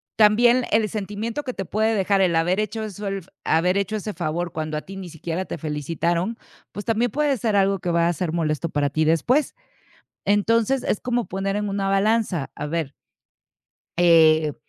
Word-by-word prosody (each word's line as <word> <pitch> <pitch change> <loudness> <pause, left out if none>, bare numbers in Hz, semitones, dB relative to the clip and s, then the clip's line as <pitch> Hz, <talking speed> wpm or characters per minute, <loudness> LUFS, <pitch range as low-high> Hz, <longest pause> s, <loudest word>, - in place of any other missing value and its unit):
también 235 +3 +5
el 215 -1 +2
sentimiento 215 +6 -4
que 255 - -4
te 195 - -4
puede 220 +4 0
dejar 195 0 +2
el 180 -3 +2
haber 175 +4 +2
hecho 215 +1 -2
eso, 205 -1 -6
el 195 0 -3 0.2
haber 180 +4 +2
hecho 200 +2 -1
ese 210 0 -4
favor 170 0 -3
cuando 155 -1 -4
a 150 - -3
ti 195 - -11
ni 185 -2 -7
siquiera 165 +3 -4
te - - -6
felicitaron, 170 - -2 0.4
pues, 205 - -6
también 230 +1 +1
puede 290 -2 +1
ser 215 -1 0
algo 195 0 +3
que 180 - -3
va 170 0 +2
a - - +1
ser 165 0 -3
molesto 160 -1 -1
para 145 -1 0
ti 155 +2 0
después. 240 - +2 0.7
Entonces 230 +5 +2
es - - 0
como 245 -4 -1
poner 195 +2 -2
en 210 0 -1
una 195 0 -1
balanza, 195 -6 +1
a 150 - -5
ver. 155 -3 -2 1.1
Eh 160 -3 +5
195 Hz, 190 wpm, -23 LUFS, 165-215 Hz, 1.1 s, también